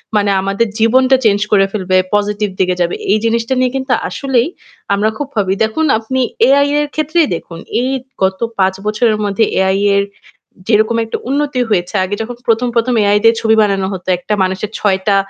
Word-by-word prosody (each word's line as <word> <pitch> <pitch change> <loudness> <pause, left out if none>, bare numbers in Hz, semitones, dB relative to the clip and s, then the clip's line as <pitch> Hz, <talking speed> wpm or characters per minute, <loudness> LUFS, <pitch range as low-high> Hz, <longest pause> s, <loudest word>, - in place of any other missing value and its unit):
মানে 205 -1 +2
আমাদের 200 +4 0
জীবনটা 255 +4 +4
চেঞ্জ 205 -1 +3
করে 195 -2 +4
ফেলবে, 185 -3 0 0.2
পজিটিভ 205 0 0
দিকে 180 -1 +1
যাবে। 175 - 0 0.2
এই 215 - +4
জিনিসটা 230 +2 0
নিয়ে 255 -1 +1
কিন্তু 265 -1 -1 0.2
আসলেই 265 -3 0 0.5
আমরা 210 +2 +1
খুব 290 - -4
ভাবি। 190 -2 +1
দেখুন, 220 +9 0
আপনি 260 +4 -3 0.3
এআই-এর 285 +2 +3
ক্ষেত্রেই 310 +1 +1
দেখুন। 165 0 -9 0.2
এই 255 - -1 0.3
গত 190 0 0 0.2
৫ 190 0 +3
বছরের 215 +1 +1
মধ্যে 205 +2 +1 0.2
এআই-এর 200 +1 +2 0.6
যেরকম 220 +1 +2
একটা 225 - -4
উন্নতি 280 -2 0
হয়েছে, 180 -2 -1
আগে 190 +2 -2
যখন 240 +2 -5
১ম-১ম 235 +1 +1
এআই 205 0 +3
দিয়ে 225 0 +5
ছবি 220 0 +3
বানানো 195 -2 +1
হতো, 185 0 -8
একটা 210 +4 -4
মানুষের 190 +2 -2
৬টা 195 0 +1
215 Hz, 170 wpm, -15 LUFS, 195-250 Hz, 0.6 s, দিয়ে